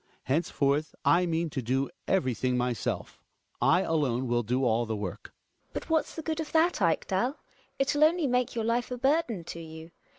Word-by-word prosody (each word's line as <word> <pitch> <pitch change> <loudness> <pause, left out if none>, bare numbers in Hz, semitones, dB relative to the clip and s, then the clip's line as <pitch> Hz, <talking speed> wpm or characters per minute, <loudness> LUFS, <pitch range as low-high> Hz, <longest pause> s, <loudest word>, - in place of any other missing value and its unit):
Henceforth 145 0 0
I 180 +1 +4
mean 165 -1 -1
to 135 - -2
do 130 +3 0 0.2
everything 130 - +1
myself; 125 -1 -2 0.4
I 180 +3 +4
alone 135 -8 0
will 120 0 +2
do 125 +4 0
all 115 0 +2
the 110 - -2
work. 100 -4 -5
GiNA. - - -13 0.4
But - - -5
what's 320 -1 +1
the 320 - -5
good 320 0 -2
of 315 - -4
that, 325 -4 +3
Ekdal? 190 - +1 0.4
It'll 290 +2 +2
only 335 0 +2
make 250 -2 +1
your 225 -2 -1
life 235 +1 0
a 250 - -4
burden 265 - +1
to 170 - -7
you. 160 0 -10
165 Hz, 185 wpm, -29 LUFS, -, 0.4 s, I